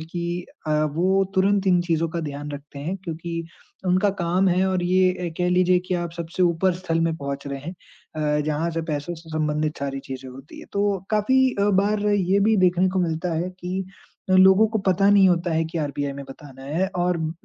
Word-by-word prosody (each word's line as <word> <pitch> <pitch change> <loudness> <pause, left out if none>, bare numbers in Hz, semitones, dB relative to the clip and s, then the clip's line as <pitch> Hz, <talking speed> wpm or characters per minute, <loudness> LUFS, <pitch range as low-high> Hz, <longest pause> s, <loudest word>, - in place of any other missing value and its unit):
कि 170 +2 -4 0.2
अ, - - -1 0.2
वो 190 +4 +2
तुरंत 195 +1 +2
इन 180 -2 +4
चीज़ों 165 -1 0
का 170 +1 -3
ध्यान 145 -1 -6
रखते 145 0 -9
हैं 165 +7 -3
क्योंकि 165 0 -4 0.4
उनका 185 +3 +3
काम 180 +3 +2
है 185 +1 +2
और 185 -1 0
ये 185 +1 +3
ए, 180 -1 -4
कह 180 0 +1
लीजिए 180 0 +4
कि 185 - -1
आप 175 -1 -2
सबसे 170 +2 -3
ऊपर 175 +2 +2
स्थल 175 -2 -2
में 165 0 +1
पहुँच 140 -1 -5
रहे 140 -1 -4
हैं 160 +6 -6 0.7
अ, - - +1
जहाँ 155 +2 -1
से 165 0 -3
पैसों 155 +1 -3
से 165 0 -14
संबंधित 155 0 -1
सारी 135 -1 -3
चीज़ें 130 -1 -8
होती 135 +3 -12
हैं। - - -12
तो 200 -1 +1
काफ़ी 215 +5 +2 0.2
अ, 205 +1 +3
बार 210 +1 0 0.3
ये 200 - +5
भी 220 +2 +3
देखने 185 0 +3
को 185 +1 -1
मिलता 170 0 -1
है 170 +3 -1
कि 185 +2 -3 0.5
लोगों 190 +3 +6
को 220 - -1
पता 195 +1 +3
नहीं 200 -2 +6
होता 175 0 +1
है 160 0 +1
कि 160 +1 -4
आरबीआई 145 -2 -2
में 140 0 -8
बताना 135 -1 -12
है 160 +7 0
और 180 0 +1
म 160 -1 -2
175 Hz, 215 wpm, -23 LUFS, 155-185 Hz, 0.7 s, लोगों